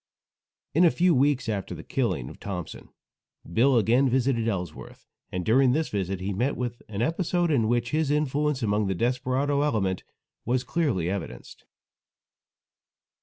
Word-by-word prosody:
In 165 +5 +4
a 170 - +7
few 175 +2 +3
weeks 135 -2 +2
after 100 -4 -3
the 80 - -9
killing 110 - -1
of - - -11
Thompson, 90 -5 -6 0.6
Bill 120 +9 +3
again 120 +5 +3
visited 125 -2 +1
Ellsworth, 90 -7 -5 0.3
and 90 -1 -3
during 125 +2 +4
this 155 +2 0
visit 95 -2 -2
he 100 +2 -2
met 125 +9 -1
with 120 -1 -4
an 105 +1 -2
episode 175 +3 0
in 115 -7 +2
which 120 +1 0
his 155 -1 +1
influence 150 -2 0
among 105 -1 +1
the 95 - -1
desperado 130 +5 0
element 100 -10 0 0.4
was 125 +1 0
clearly 135 - 0
evidenced. 95 -1 -6
125 Hz, 150 wpm, -26 LUFS, 100-140 Hz, 0.6 s, a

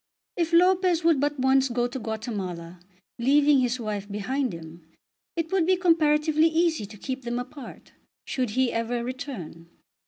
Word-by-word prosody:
If 335 -1 -1
Lopez 360 0 +4
would 330 -4 +4
but 290 +1 0
once 265 +1 +3
go 240 0 0
to 245 +2 -4
Guatemala, 195 -7 -5 0.4
leaving 285 +3 +4
his 250 0 0
wife 210 -3 -4
behind 250 +6 -2
him, 165 0 -10 0.5
it 330 -1 -3
would 370 -4 +2
be 375 0 +4
comparatively 310 -2 +3
easy 320 -8 +1
to 210 +1 -12
keep 260 +5 -5
them 240 0 -3
apart 245 +2 -9 0.3
should 255 -3 -2
he 255 +3 +1
ever 235 +1 -1
return. 235 - -7
260 Hz, 155 wpm, -26 LUFS, 220-310 Hz, 0.5 s, Lopez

